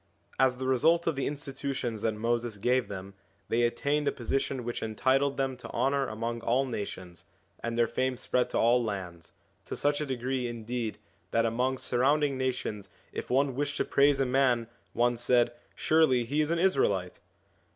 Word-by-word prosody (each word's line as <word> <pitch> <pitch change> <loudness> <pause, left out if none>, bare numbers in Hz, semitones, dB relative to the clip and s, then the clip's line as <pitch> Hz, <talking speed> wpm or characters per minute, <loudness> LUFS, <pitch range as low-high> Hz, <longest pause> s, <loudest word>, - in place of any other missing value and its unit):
As 130 -1 +4
the 130 +1 -5
result 160 +7 +3
of 165 - +1
the 135 - -1
institutions 135 -5 -3
that 110 -1 0
Moses 115 0 -1
gave 125 +4 +1
them, 100 0 -7 0.4
they 115 - +2
attained 140 +5 +1
a - - +3
position 130 +1 -2
which 120 0 -4
entitled 130 +5 +1
them 135 -1 0
to 125 - -10
honour 135 +3 +1
among 115 +2 -4
all 125 +4 +2
nations, 95 -7 -6 0.3
and 115 0 -3
their 120 - +4
fame 130 +2 -1
spread 125 0 0
to - - -2
all 120 +1 +4
lands; 90 -6 -5 0.3
to - - -5
such 145 +1 +1
a - - -1
degree 130 0 -2
indeed 115 -1 -4 0.3
that 115 0 +2
among 125 +3 0
surrounding 140 +4 +2
nations 125 -6 -3 0.2
if - - -5
one 135 +1 +2
wished 145 +2 -2
to - - +1
praise 140 0 +3
a 135 - +3
man 125 -2 +2 0.3
one 120 0 +2
said, 120 0 +3 0.2
'surely 145 -7 +3
he 145 +6 0
is 150 - 0
an 170 - +1
Israelite.' 105 - +1
125 Hz, 175 wpm, -29 LUFS, 115-135 Hz, 0.4 s, As